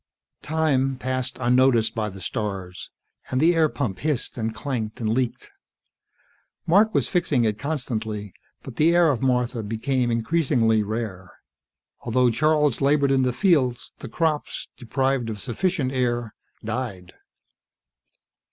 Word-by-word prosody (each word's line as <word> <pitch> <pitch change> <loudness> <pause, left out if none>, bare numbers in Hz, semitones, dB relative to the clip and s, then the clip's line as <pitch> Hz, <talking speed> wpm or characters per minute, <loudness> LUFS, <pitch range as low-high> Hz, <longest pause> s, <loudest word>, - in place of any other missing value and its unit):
Time 140 -4 +1
passed 130 -1 -3
unnoticed 125 -2 +3
by 110 -2 -2
the 95 -1 -10
stars, 95 -4 -4 0.4
and 130 - 0
the 165 +4 +5
air 160 -2 +3
pump 110 -12 -3
hissed 150 -4 -1
and 115 -2 -2
clanked 115 -2 -4
and 110 -2 -1
leaked. 125 +1 -2 1.1
Mark 205 +6 +4
was - - +2
fixing 160 -9 +1
it 105 -1 -1
constantly, 110 - -4 0.3
but 125 -3 -10
the 165 +3 +4
air 170 -3 +5
of 130 - -2
Martha 125 -2 0
became 120 +4 -1
increasingly 115 -3 +2
rare. 105 -4 -4 0.7
Although 125 +1 +2
Charles 150 +1 +2
labored 140 0 +3
in 135 -1 +3
the 130 -1 +2
fields, 130 -4 +1
the 135 - -8
crops, 155 +2 -2
deprived 130 0 -1
of 105 -2 -5
sufficient 135 - -1
air, 120 -3 -1 0.3
died. 110 -6 -4
125 Hz, 135 wpm, -24 LUFS, 110-140 Hz, 1.1 s, the